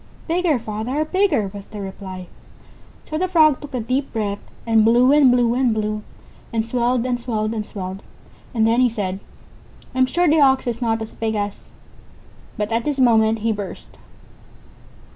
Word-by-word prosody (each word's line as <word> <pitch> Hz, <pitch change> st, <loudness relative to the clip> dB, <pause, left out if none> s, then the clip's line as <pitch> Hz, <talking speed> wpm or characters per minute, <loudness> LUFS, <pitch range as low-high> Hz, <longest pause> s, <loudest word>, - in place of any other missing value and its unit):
"Bigger, 340 Hz, -3 st, +2 dB
father, 230 Hz, +6 st, -3 dB
bigger," 310 Hz, -, +1 dB
was 200 Hz, -1 st, -8 dB
the 210 Hz, -, -9 dB
reply. 190 Hz, -1 st, -7 dB, 0.8 s
So 310 Hz, -, -4 dB
the 370 Hz, -, +1 dB
Frog 310 Hz, -6 st, +4 dB
took 290 Hz, -3 st, -8 dB
a -, -, -1 dB
deep 255 Hz, +5 st, -2 dB
breath, 205 Hz, -3 st, -2 dB, 0.3 s
and 225 Hz, -1 st, +4 dB
blew 240 Hz, +4 st, +5 dB
and 290 Hz, -3 st, +6 dB
blew 240 Hz, -1 st, +3 dB
and 250 Hz, -3 st, +1 dB
blew, 215 Hz, 0 st, -2 dB, 0.5 s
and 225 Hz, -1 st, -1 dB
swelled 245 Hz, +1 st, 0 dB
and 245 Hz, -1 st, -1 dB
swelled 220 Hz, -3 st, -2 dB
and 220 Hz, -2 st, -2 dB
swelled. 190 Hz, -1 st, -7 dB, 0.5 s
And 225 Hz, -3 st, +1 dB
then 230 Hz, +2 st, +3 dB
he 250 Hz, -, +4 dB
said: 195 Hz, -4 st, -3 dB, 0.7 s
"I'm 255 Hz, 0 st, +3 dB
sure 350 Hz, +5 st, +1 dB
the 310 Hz, 0 st, +4 dB
Ox 265 Hz, -1 st, +4 dB
is 240 Hz, 0 st, -3 dB
not 225 Hz, -1 st, 0 dB
as 220 Hz, -, -9 dB
big 220 Hz, -1 st, -2 dB
as 205 Hz, -1 st, -2 dB, 0.6 s
______" -, -, -26 dB
But 210 Hz, +1 st, -2 dB
at 230 Hz, +1 st, 0 dB
this 290 Hz, +1 st, -2 dB
moment 225 Hz, -3 st, +3 dB
he 230 Hz, -, +3 dB
burst. 205 Hz, -3 st, -7 dB
230 Hz, 180 wpm, -21 LUFS, 215-260 Hz, 0.8 s, and